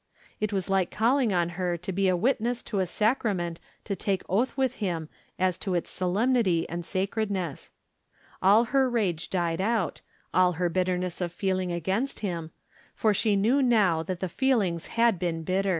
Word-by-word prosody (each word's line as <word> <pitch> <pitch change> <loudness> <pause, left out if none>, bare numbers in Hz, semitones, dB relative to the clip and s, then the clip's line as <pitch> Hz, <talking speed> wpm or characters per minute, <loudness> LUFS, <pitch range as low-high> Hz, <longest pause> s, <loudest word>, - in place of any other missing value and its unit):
It 215 0 -1
was 190 -3 -1
like 195 -2 +1
calling 240 +1 +2
on 175 -2 +1
her 175 0 -2
to 180 +3 -5
be 195 +1 +1
a 185 -1 +3
witness 240 +2 0
to 205 - -3
a 185 - +1
sacrament 195 -5 0 0.2
to 200 - -3
take 195 -1 -1
oath 230 +10 0
with 260 -1 0
him 165 -5 -2 0.3
as 185 -1 +1
to 190 -2 -2
its 175 - -2
so 180 -1 -1
lemnity 210 -5 +2
and 170 +1 -4
sacredness. 190 -3 -2 0.7
All 205 +5 +6
her 265 -1 +4
rage 195 -9 -1
died 170 -1 -1
out, 210 -5 0 0.3
all 180 -1 +4
her 175 +1 0
bitterness 180 0 -1
of 175 -1 -1
feeling 185 0 -1
against 190 - -2
him, 170 -6 -3 0.5
for 215 -1 +2
she 205 +1 +2
knew 230 +8 +3
now 210 -10 +3
that 180 +1 -5
the 185 - 0
feelings 200 -6 0
had 230 -5 +2
been 165 -2 -2
bitter. 190 +3 0
190 Hz, 180 wpm, -27 LUFS, 175-220 Hz, 0.7 s, All